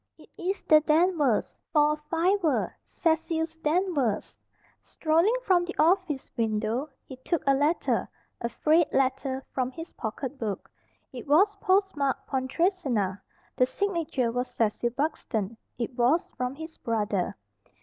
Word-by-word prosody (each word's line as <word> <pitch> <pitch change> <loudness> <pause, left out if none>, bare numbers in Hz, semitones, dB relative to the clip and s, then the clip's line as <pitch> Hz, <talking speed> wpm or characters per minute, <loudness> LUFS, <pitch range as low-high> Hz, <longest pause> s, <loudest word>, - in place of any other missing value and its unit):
"It - - -18
is 380 +3 -3
the 310 -1 +6
Danvers, 310 - +2
for 300 -1 +4
a - - -2
fiver 330 +2 0
Cecil's 320 0 0
Danvers." 305 - 0 0.5
Strolling 335 +8 +2
from 365 -5 +3
the 350 +1 -5
office 325 -3 +2
window, 225 +5 -1 0.2
he 260 - -10
took 325 +6 -2
a 275 - +5
letter 290 +5 +1 0.3
a 235 - -1
frayed 310 +6 +2
letter 265 0 0
from 255 -1 -1
his 325 +6 -9
pocket 260 +5 -5
book. 210 -4 -4 0.4
It 250 +1 -8
was 375 +9 +5
post 385 -1 +2
marked 280 -2 -1
"Pontresina." 260 - 0 0.3
The 255 - +3
signature 330 -10 -1
was 250 +1 -1
"Cecil 225 +1 0
Buxton" 235 -6 -2 0.2
it 240 +1 -3
was 255 +8 +3
from 250 +1 -2
his 320 +2 -9
brother. 210 - -1
290 Hz, 135 wpm, -27 LUFS, 245-335 Hz, 0.5 s, the